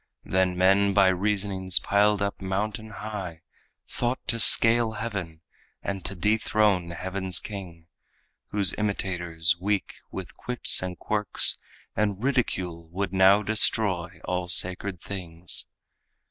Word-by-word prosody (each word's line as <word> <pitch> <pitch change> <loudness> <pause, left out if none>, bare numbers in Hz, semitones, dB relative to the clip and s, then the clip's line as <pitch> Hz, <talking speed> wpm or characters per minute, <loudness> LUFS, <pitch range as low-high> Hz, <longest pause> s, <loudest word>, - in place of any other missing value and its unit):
Then 95 -1 0
men 95 +2 +3
by 100 -2 +5
reasonings 95 -1 0
piled 105 0 +2
up 100 0 -4
mountain 105 +3 -3
high 100 -6 -7 0.4
Thought 120 +2 -2
to 115 -1 +1
scale 115 +1 +5
heaven, 95 -8 -6 0.4
and 95 -2 -4
to 100 - -2
dethrone 105 -1 +1
heaven's 95 +1 +1
king, 90 -6 -9 0.6
Whose 100 -2 +1
imitators 85 -5 -1
weak, 100 +1 -1 0.2
with - - -8
quips 125 -1 +3
and 90 -1 -5
quirks 105 -1 +2 0.4
And 105 0 -1
ridicule 95 -11 -2
would 95 +3 -4
now 95 +2 +5
destroy 105 -4 0
all 90 -1 -2
sacred 90 +1 +1
things. 85 -3 -4
95 Hz, 120 wpm, -25 LUFS, 90-105 Hz, 0.6 s, by